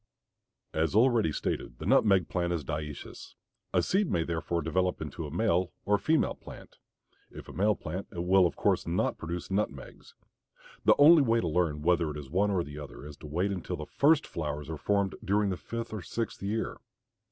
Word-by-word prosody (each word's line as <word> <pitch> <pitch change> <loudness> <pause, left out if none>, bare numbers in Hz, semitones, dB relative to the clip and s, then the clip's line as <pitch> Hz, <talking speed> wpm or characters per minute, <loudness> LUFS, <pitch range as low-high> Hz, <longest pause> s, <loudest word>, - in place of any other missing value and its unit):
As 80 +3 0
already 115 -6 +4
stated - - -3
the - - -7
nutmeg 95 -5 +4
plant 85 -1 -1
is 80 -3 -2
dioecious. 75 +1 -6 0.4
A - - +2
seed 195 0 +1
may 85 - +1
therefore 85 0 -2
develop 90 +3 0
into 80 +1 -5
a - - -9
male 90 0 +1
or 105 0 +3
female 160 0 +2
plant; - - -13 0.5
if - - -11
a - - -10
male 105 +2 +2
plant 90 +5 -6
it 85 - -4
will 95 0 +5
of - - -7
course - - +1
not - - 0
produce 85 +3 -5
nutmegs. 95 -9 -4 0.7
The - - +6
only 155 +2 +8
way 115 -3 +3
to 90 - -1
learn 75 -2 0
whether 85 -1 +2
it 75 - -5
is 70 -2 -9
one 100 +4 +2
or 95 -4 +1
the 75 0 -8
other 75 -1 -9
is 75 -1 -9
to 75 - -10
wait 90 +7 0
until 95 -2 -4
the - - -6
first 155 +2 +3
flowers 75 -1 -4
are - - -3
formed 100 -2 +1
during 100 0 +1
the - - -1
fifth 115 +5 -6
or 110 - -4
sixth 115 +4 -4
year. 105 +3 -2
90 Hz, 200 wpm, -29 LUFS, 80-105 Hz, 0.7 s, only